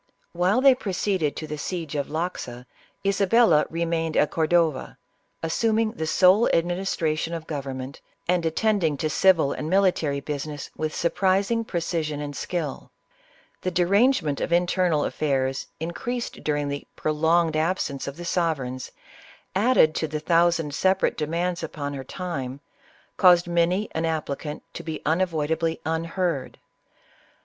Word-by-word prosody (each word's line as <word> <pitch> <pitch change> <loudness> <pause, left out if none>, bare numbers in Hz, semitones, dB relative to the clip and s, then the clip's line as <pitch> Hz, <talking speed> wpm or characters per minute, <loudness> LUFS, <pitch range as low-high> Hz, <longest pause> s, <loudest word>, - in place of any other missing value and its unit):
While 185 +8 +2
they 270 0 +7
proceeded 190 - -1
to 155 - -5
the 150 -1 -6
siege 165 -1 -4
of 140 -1 -1
Loxa, 155 -7 -4 0.4
Isabella 195 -4 +4
remained 165 -1 -1
at 150 - +3
Cordova, 160 -3 +1 0.5
assuming 220 +6 +1
the 160 -9 -4
sole 185 +7 +5
administration 170 -2 0
of 165 -1 -6
government, 135 -3 -5 0.3
and 180 -1 +2
attending 165 -2 +1
to 155 +2 -1
civil 165 -3 +4
and 155 - -4
military 180 -7 +2
busi 145 +1 -4
ness 145 -1 -7
with 155 -1 -3
surprising 195 +6 +1
precision 165 -6 -2
and 145 -1 -5
skill. 160 -4 -4 0.7
The 185 - -1
derange 200 +9 +3
ment 145 -2 -2
of - - -2
internal 175 -3 +2
affairs, 135 -3 -1
increased 235 +10 -4
during 145 -1 0
the 140 0 -5
prolonged 160 +1 +1
absence 155 -3 -1
of 140 +2 -6
the 175 - -7
sovereigns, 140 -8 -1 0.6
added 195 -6 +4
to 160 - 0
the 155 0 -3
thousand 165 -1 +2
sepa 190 +5 +1
rate - - +2
demands 170 +3 -1
upon 145 -3 -4
her 135 -1 -5
time, 140 -5 -5 0.6
caused 175 -2 +6
many 175 +4 +1
an 160 +1 -1
applicant 150 -2 -3
to - - -6
be 160 -2 -6
unavoidably 160 -1 0
unheard. 165 -2 -2
165 Hz, 140 wpm, -25 LUFS, 150-180 Hz, 0.7 s, they